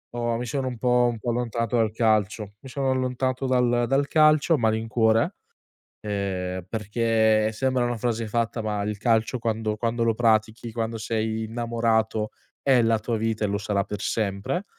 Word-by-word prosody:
ho 120 -1 -1
mi 120 - -4
sono 130 +2 -2
un 125 -2 -4
po' 125 0 +3
un 115 - -7
po' 120 +2 -2
allontanato 115 -1 -1
dal 110 -2 +2
calcio. 110 -2 0
Mi 135 - -11
sono 135 +1 -1
allontanato 130 0 -1
dal 125 -2 +2
dal 135 +3 +1
calcio 155 +1 +4
a - - +4
malincuore, 110 0 +1 0.7
ehm, 95 -3 -3
perché, 110 +1 +1
sembra 130 +2 0
una 120 -1 -2
frase 115 -1 -1
fatta, 115 +1 -1
ma 105 -1 -2
il 105 +1 -2
calcio 115 +2 +1
quando 110 -2 -2
quando 115 +1 -1
lo 115 -1 +2
pratichi, 110 0 +1
quando 115 0 -3
sei 110 0 -2
innamorato, 115 -1 0 0.3
è 130 -3 +4
la 115 -1 +3
tua 115 +1 -2
vita 110 -1 -1
e - - +1
lo 100 +1 -1
sarà 100 -1 -1
per 105 +1 -6
sempre. 105 - -2
115 Hz, 175 wpm, -25 LUFS, 110-120 Hz, 0.7 s, calcio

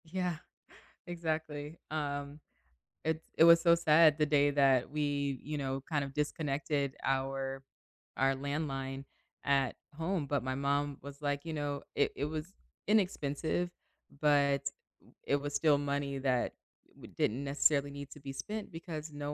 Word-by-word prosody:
Yeah, 180 0 -2 0.7
exactly. 160 -3 -3
Um, 145 -1 -3 0.6
it 160 0 0 0.2
it - - +7
was 170 0 +9
so 170 0 +6
sad 155 -2 +6
the 155 - +3
day 145 -1 +4
that 135 -3 +4
we, 145 -2 -1
you 150 +1 -3
know, 135 -1 -2
kind 145 -3 +1
of 140 -1 -6
disconnected 145 -2 -1
our 135 0 -1 0.5
our 135 0 +3
landline 135 -1 -3 0.4
at 140 -2 +2 0.2
home, 165 -1 -1
but 140 -1 0
my 130 0 -2
mom 140 +1 0
was, 140 +1 -10
like, 145 -1 0
you 165 -1 -5
know, 145 -2 -2
it 140 - +2
it 140 - -1
was 155 +1 -3 0.4
inexpensive, 175 -5 +1 0.5
but 140 -2 +4
oo 140 0 -5 0.5
it 140 - +3
was 145 0 -3
still 145 0 +4
money 140 -1 -1
that 130 -2 +1 0.4
w - - -13
didn't 125 +6 +1
necessarily 140 0 +2
need 140 0 -7
to 150 - -12
be 135 0 -6
spent 210 +11 -5
because 165 -2 -6
no 145 0 -4
145 Hz, 150 wpm, -33 LUFS, 140-155 Hz, 0.7 s, was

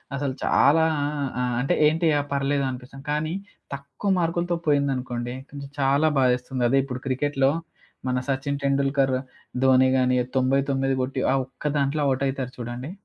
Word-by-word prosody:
అసలు 140 -1 -2
చాలా 160 +3 +4 0.6
ఆ! - - +1 0.2
అంటే 135 - +1
ఏంటి 165 +2 +2
అ - - +1
పర్లేదనిపిస్తది. 135 -1 -2
కానీ 155 +2 -1 0.4
తక్కువ 140 +8 -4
మార్కులతో 170 0 0
పోయిందనుకోండి 130 -4 0 0.2
కొంచం 140 -1 -8
చాలా 140 +3 +3
బాధేస్తుంది. 125 0 +1
అదే 135 +3 +3
ఇప్పుడు 130 -2 -5
క్రికెట్‌లో 135 +1 +1 0.6
మన 125 - 0
సచిన్ 140 +1 -1
టెండూల్కర్, 140 -1 +2 0.5
ధోని 130 0 +5
గాని 125 -1 +2 0.2
99 135 +1 +1
కొట్టి 130 +1 -2
ఆ - - +2
ఒక్క 135 - -16
దాంట్లో 140 +2 0
ఔట్ 135 +1 -1
అయితరు 130 -1 -4
చూడండి. 120 +4 -5
135 Hz, 140 wpm, -24 LUFS, 130-140 Hz, 0.6 s, ధోని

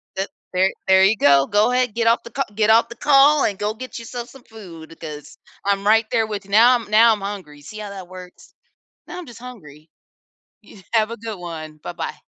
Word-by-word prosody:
The 195 +1 -2 0.3
there 190 +1 +2 0.2
there 190 0 +5
you 205 +2 +3
go, 140 -3 +4
go 210 +4 +2
ahead, 250 -3 0
get 230 0 0
off 230 +1 +3
the 235 - -11
ca - - -1
get 215 0 +1
off 225 +1 +4
the 235 - -9
call 285 +2 +4
and 200 - -2
go 210 +1 -1
get 255 +1 -8
yourself 240 +1 -7
some 265 -1 -16
food, 170 -7 -13
'cause 150 -2 -9 0.3
I'm 200 0 0
right 220 +1 +4
there 225 -1 +1
with 205 -2 -6
you 200 - -16
now 235 +4 +6
I'm 230 -3 -5
now 225 +2 +6
I'm 210 - -5
hungry, 190 -8 -7
see 215 +9 -10
how 210 - -7
that 190 -3 -9
works? 180 -1 -13 0.5
Now 355 - -8
I'm 350 - -8
just 235 - -12
hungry. 155 - -13 0.8
Y 200 -2 -16
have 220 -1 +2
a - - -6
good 220 -3 -7
one, 160 -3 -8
buh-bye. - - -6
210 Hz, 225 wpm, -21 LUFS, 185-230 Hz, 0.8 s, now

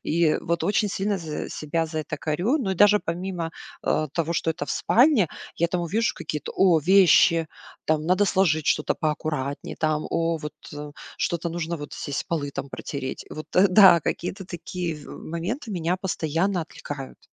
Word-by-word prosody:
И, 170 +2 +1
э, - - 0
вот 170 0 -1
очень 210 +1 +2
сильно 200 +1 -1
з 160 -3 -5
себя 165 +2 -2
за 160 0 -4
это 155 0 -5
корю. 175 - 0
Но 205 -9 -1
и - - -2
даже 205 +3 +6
помимо, 175 -1 -4 0.3
э, 155 - +1
того, 165 -1 -1
что 165 - 0
это 150 -2 -4
в - - -5
спальне, 245 - +4 0.3
я 170 - +1
там 180 +1 -1
увижу 210 +7 0
какие-то: 150 -1 -5
о, 190 -2 +5
вещи, 170 -2 +5 0.4
там 155 -1 +1
надо 185 +3 +3
сложить 175 -6 +2
что-то - - +2
поаккуратнее, 150 -3 -3
там, 155 -1 0
о, 165 0 0
вот, 150 -1 -7 0.2
э, 150 0 -7 0.3
что-то 170 0 -1
нужно 170 0 -3
вот, 145 -2 -8
здесь 145 - -4
полы 150 -4 -2
там 140 0 -5
протереть. 135 -1 -5
Вот, 155 - -7
э, 190 +2 +6
да, 185 -2 +8
какие-то 185 +6 -3
такие, 175 -1 -4
в 150 - -12
э, - - -9
моменты 200 - -4
меня 175 -2 0
постоянно 180 0 -1
отвлекают. 145 -4 -8
170 Hz, 185 wpm, -25 LUFS, 155-190 Hz, 0.4 s, да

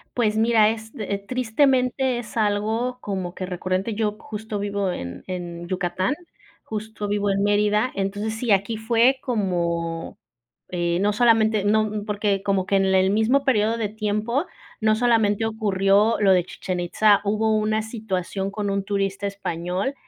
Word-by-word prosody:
Pues 215 -3 +1
mira, 220 -1 +4
es, 225 0 -5
eh, 200 -2 -3
tristemente 255 +1 +1
es 230 0 -8
algo 220 +4 0
como 190 -3 -4
que 185 - -4
recurrente. 185 +4 -2
Yo 210 -1 0
justo 215 0 -6
vivo 200 -2 -1
en 85 - -6
en 175 -2 -6
Yucatán, 185 +4 -1 0.5
justo 215 -1 -5
vivo 205 0 0
en 195 +1 +1
Mérida. 210 +3 +2
Entonces, 205 +3 -2
sí, 225 -1 -1
aquí 200 +3 +2
fue 235 +4 +3
como, 170 -7 -2 0.5
eh, 175 -1 0
no 205 +1 +2
solamente 220 -2 +3
no 215 +1 +3
n 210 - -3
porque 205 -2 0
como 195 -2 +1
que 200 - 0
en 195 - +2
el 190 0 +3
mismo 230 +6 +2
período 225 -3 +2
de 215 -3 -2
tiempo 215 - -1 0.4
no 215 0 +3
solamente 225 -2 +2
ocurrió 210 0 +2
lo 195 -2 +4
de 180 -2 +3
Chichén 185 -1 -4
Itzá, 205 +4 +3
hubo 215 +1 +1
una 215 0 +1
situación 195 -3 -3
con 205 -1 -3
un 195 0 -1
turista 195 0 -1
español, 190 +4 -3
210 Hz, 160 wpm, -23 LUFS, 195-220 Hz, 0.5 s, mira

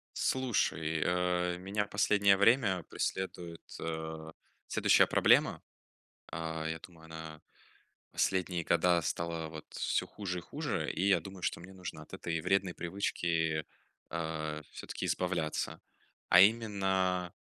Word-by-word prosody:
Слушай, 80 -11 0
э, 90 0 +1
меня 100 +3 -1
в - - -19
последнее 100 -1 +4
время 100 -4 +4
преследует, 90 -3 -3 0.2
э, 80 -1 -4 0.4
следующая - - +5
проблема. - - +4 0.7
А, 80 -1 -3
я 80 - -3
думаю, 80 -1 -14
она 80 -1 -8 0.7
последние 90 -2 0
года 85 +1 +3
стала, 85 +2 -2
вот, 80 0 -9
всё - - 0
хуже 90 -4 -4
и - - -6
хуже, - - -3
и 95 +4 +1
я 95 -3 +5
думаю, 95 +2 -10
что - - -1
мне 90 +3 -11
нужно 90 -1 -7
от - - -16
этой 80 -1 -2
вредной 95 +1 +1
привычки, 85 -3 -1 0.5
а, 80 -2 -3
всё-таки - - -5
избавляться, 85 -4 -1 0.5
а 90 - +9
именно 95 -4 +2
90 Hz, 125 wpm, -32 LUFS, 80-95 Hz, 0.7 s, а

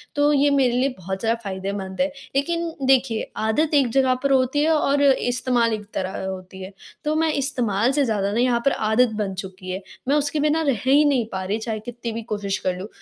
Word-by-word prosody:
तो 290 0 +3
ये 285 0 +4
मेरे 270 -4 +3
लिए 255 +3 +2
बहुत 190 +1 -5
ज़्यादा 230 +2 0
फायदेमंद 190 0 -4
है। 275 - +3 0.3
लेकिन 335 +4 -1
देखिए 260 -4 +2
आदत 290 +9 0
एक 275 -4 +4
जगह 260 0 +3
पर 275 - +2
होती 265 +1 +2
है 315 - +2
और 285 -2 +2
इस्तेमाल 245 -3 +2
एक 210 -1 -4
तरह 190 +1 -3
होती 190 0 -7
है। 190 - -8 0.3
तो 300 +1 0
मैं 320 0 +2
इस्तेमाल 245 -5 0
से 280 0 +2
ज़्यादा 205 -4 0
ना 225 - 0
यहाँ 245 -1 +2
पर 275 - +4 0.2
आदत 245 +3 +4
बन 195 -1 -4
चुकी 185 -1 -10
है। 190 +2 -4 0.3
मैं 280 - +3
उसके 295 +1 0
बिना 305 +2 +2
रह 275 -8 0
ही 280 +3 +5
नहीं 270 -5 +2
पा 190 0 -3
रही 200 +3 -1
चाहे 220 -1 -4
कितनी 240 -1 -5
भी 230 +1 -4
कोशिश 200 -2 -2
कर 180 -1 0
लूँ, 190 +3 -6
245 Hz, 220 wpm, -23 LUFS, 200-280 Hz, 0.3 s, ही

